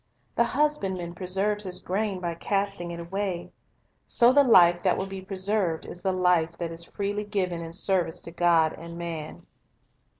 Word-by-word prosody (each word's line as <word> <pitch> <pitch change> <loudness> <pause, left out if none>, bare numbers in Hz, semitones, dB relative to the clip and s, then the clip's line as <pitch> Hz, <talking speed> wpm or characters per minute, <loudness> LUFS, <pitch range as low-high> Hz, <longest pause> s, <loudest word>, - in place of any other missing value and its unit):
The 235 - +3
husbandman 200 - 0
preserves 195 +3 0
his 185 -2 -2
grain 200 0 -2
by 175 -2 -3
casting 195 0 -2
it 170 0 -6
away. 180 0 -3 0.6
So 240 +1 +5
the 285 +1 +6
life 175 -8 +6
that 185 -1 +2
will 190 - -2
be 195 -1 -7
preserved 190 -3 -1
is 175 - -8
the 190 0 0
life 180 -3 +2
that 170 -1 -4
is 165 0 -3
freely 205 +3 -3
ijiven 185 -5 -2
in 165 - -7
service 180 -2 0
to 170 - -6
God 170 -2 +3
and 170 +1 -9
man. 165 -3 -6
185 Hz, 170 wpm, -26 LUFS, 170-200 Hz, 0.6 s, the